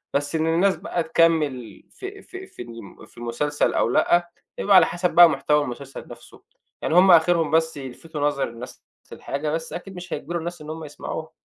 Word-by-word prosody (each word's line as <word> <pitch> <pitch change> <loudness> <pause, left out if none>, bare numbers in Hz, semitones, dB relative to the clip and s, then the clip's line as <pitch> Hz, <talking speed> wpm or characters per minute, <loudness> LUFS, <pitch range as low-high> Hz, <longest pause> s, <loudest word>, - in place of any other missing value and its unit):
بس 145 +2 -1
إن 160 0 0
الناس 180 +4 +3
بقى 175 - -3
تكمّل 150 - +1
في 395 0 -9
في 380 0 -10
في - - -12
الم 115 -4 -11
في - - -25
المسلسل 120 +6 -1
أو - - +1
لأ، 175 +7 +2 0.3
بيبقى 200 -1 +3
على 185 - +8
حسب 175 +1 -1
بقى 175 -1 +9
محتوى 150 +1 +1
المسلسل 135 +1 -8
نفْسه، - - -14 0.4
يعني 160 - -1
هُم 185 +1 +7
آخرهم 165 -1 +4
بس 160 -1 +1
يلفتوا 145 +3 -8
نظر 145 -1 0
الناس 120 +2 -11 0.3
للحاجة، 145 +2 -4
بس 160 +1 -4
أكيد 190 +2 -8
مش 180 0 -7
هيجبروا 175 0 -4
الناس 170 0 -6
إن 150 - -9
هُم 160 +1 -6
يسمعوها. 155 +2 -7
160 Hz, 190 wpm, -23 LUFS, 140-175 Hz, 0.4 s, بقى